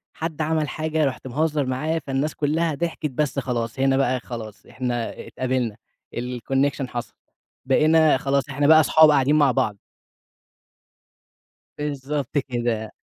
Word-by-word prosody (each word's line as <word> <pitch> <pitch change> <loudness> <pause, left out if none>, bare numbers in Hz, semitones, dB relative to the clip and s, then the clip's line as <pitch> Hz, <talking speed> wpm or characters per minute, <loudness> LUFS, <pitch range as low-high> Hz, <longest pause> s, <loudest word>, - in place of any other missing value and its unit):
حد 160 -1 -4
عمل 155 -1 0
حاجة 155 0 -1
رُحت 130 -1 -3
مهزّر 150 +2 0
معاه 155 +6 -1
فالناس 135 +3 -1
كلّها 155 +2 0
ضحكِت، 165 -2 -3
بس 140 +1 -1
خلاص 120 -1 -3
هنا 135 0 +3
بقى 130 -1 +1
خلاص، 115 -4 -8
إحنا 120 -2 -4
اتقابلنا 125 -4 -2 0.4
الconnection 135 +3 -1
حصَل، 120 -1 -5 0.5
بقينا 155 +3 +4
خلاص 140 +1 0
إحنا 145 +1 +1
بقى 155 +1 +8
أصحاب 155 0 +6
قاعدين 145 0 +3
مع 145 -3 +4
بعض. 105 -3 0 2.0
بالضبط 145 -1 -3
كده. 120 -5 -2
135 Hz, 130 wpm, -23 LUFS, 125-150 Hz, 2.0 s, بقى